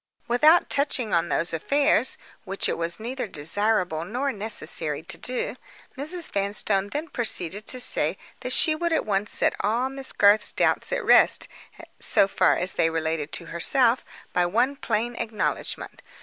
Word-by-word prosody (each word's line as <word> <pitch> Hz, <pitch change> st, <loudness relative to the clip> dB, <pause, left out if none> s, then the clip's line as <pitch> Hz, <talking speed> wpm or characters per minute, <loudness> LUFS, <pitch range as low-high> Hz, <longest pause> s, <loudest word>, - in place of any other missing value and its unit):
Without 305 Hz, +8 st, +4 dB
touching 265 Hz, -6 st, -1 dB
on 170 Hz, -1 st, +1 dB
those 170 Hz, -, -1 dB
affairs, 275 Hz, -, +1 dB, 0.3 s
which 195 Hz, -1 st, -2 dB
it -, -, -1 dB
was 170 Hz, +2 st, -3 dB
neither 245 Hz, +2 st, -5 dB
desirable 180 Hz, 0 st, 0 dB
nor 255 Hz, +9 st, -3 dB
necessary 170 Hz, -8 st, -2 dB
to 190 Hz, -, -5 dB
do, 250 Hz, 0 st, -4 dB, 0.4 s
Mrs. 315 Hz, +5 st, -3 dB
Vanstone 200 Hz, 0 st, -1 dB
then 295 Hz, +10 st, -5 dB
proceeded 210 Hz, -, -1 dB
to 255 Hz, -, +1 dB
say -, -, +3 dB, 0.2 s
that -, -, -5 dB
she 315 Hz, -, +3 dB
would 340 Hz, +2 st, -2 dB
at 320 Hz, -, 0 dB
once 205 Hz, 0 st, -1 dB
set -, -, +2 dB
all 235 Hz, +5 st, 0 dB
Miss 270 Hz, -1 st, +1 dB
Garth's 205 Hz, +1 st, +4 dB
doubts -, -, 0 dB
at -, -, -2 dB
rest, -, -, +5 dB, 0.5 s
so 195 Hz, -, +4 dB
far -, -, +2 dB
as 180 Hz, +1 st, 0 dB
they 165 Hz, -, +1 dB
related 160 Hz, -2 st, -3 dB
to -, -, -2 dB
herself, 240 Hz, +8 st, +2 dB, 0.3 s
by 180 Hz, -, +2 dB
one 235 Hz, +10 st, 0 dB
plain 235 Hz, -2 st, -2 dB
acknowledgment. 220 Hz, -2 st, -4 dB
215 Hz, 160 wpm, -24 LUFS, 180-265 Hz, 0.5 s, rest